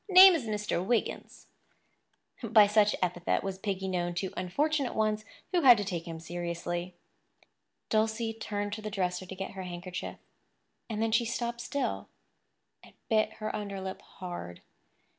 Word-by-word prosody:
"Name 375 0 +10
is 310 -8 -1
Mr. 210 -4 -1
Wiggins." 230 +4 -2 1.0
By 220 -3 +6
such 210 0 +4
epithet 175 -1 0
was 190 -1 -4
Piggy 195 -2 -2
known 175 -2 -1
to 185 +1 -2
unfortunate 280 - 0
ones 215 0 +1 0.3
who 360 -2 +3
had 250 -5 +9
to 205 - -1
take 175 -3 -4
him 165 -1 -6
seriously. 175 +1 -4 0.9
Dulcie 225 +1 +1
turned 205 -2 -3
to 215 - -5
the 215 - -4
dresser 185 -2 -2
to 190 - -7
get 195 +1 -5
her 190 - -7
handkerchief; 180 0 -6 0.7
and 220 0 -1
then 225 - +1
she 230 +2 +3
stopped 235 +1 -2
still, 280 +3 -2 0.7
and - - -17
bit 215 -1 +2
her 215 - -4
underlip 195 -2 -5
hard. 175 - -8
205 Hz, 150 wpm, -30 LUFS, 180-225 Hz, 1.0 s, Name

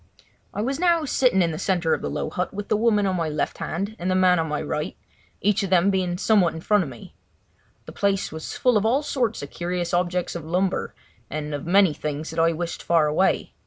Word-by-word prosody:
I 205 - -3
was 270 +4 -2
now 340 -3 +3
sitting 245 -8 +3
in 165 - 0
the 155 - -5
centre 175 -5 +1
of - - -1
the - - -3
low - - -3
hut 180 - -2
with 205 +1 -6
the - - +3
woman 210 -2 +2
on 190 -1 0
my 165 -3 -1
left 150 -1 -2
hand 200 +6 -3
and 180 - -2
the 185 - +2
man 185 -2 +4
on 160 - -1
my 150 -1 -2
right, 150 +2 -3 0.4
each 210 +1 +2
of 195 - -2
them 185 +1 +4
being 180 -2 -1
somewhat 195 -4 +3
in 160 - -6
front 210 +3 +3
of 150 - -6
me. 120 -3 -12 0.7
The - - -9
place 200 -1 0
was 160 0 -6
full 250 -3 +3
of 205 - +1
all 265 +6 +2
sorts 240 - -1
of 140 - -8
curious 175 0 -3
objects 180 0 0
of 170 - -6
lumber, 180 +4 -1 0.3
and 150 0 -4
of 145 +2 -5
many 190 -2 +5
things 150 +1 -4
that 160 - -4
I 165 0 +4
wished 170 +1 -4
far 165 -2 +3
away. 155 +6 +1
180 Hz, 235 wpm, -24 LUFS, 160-205 Hz, 0.7 s, many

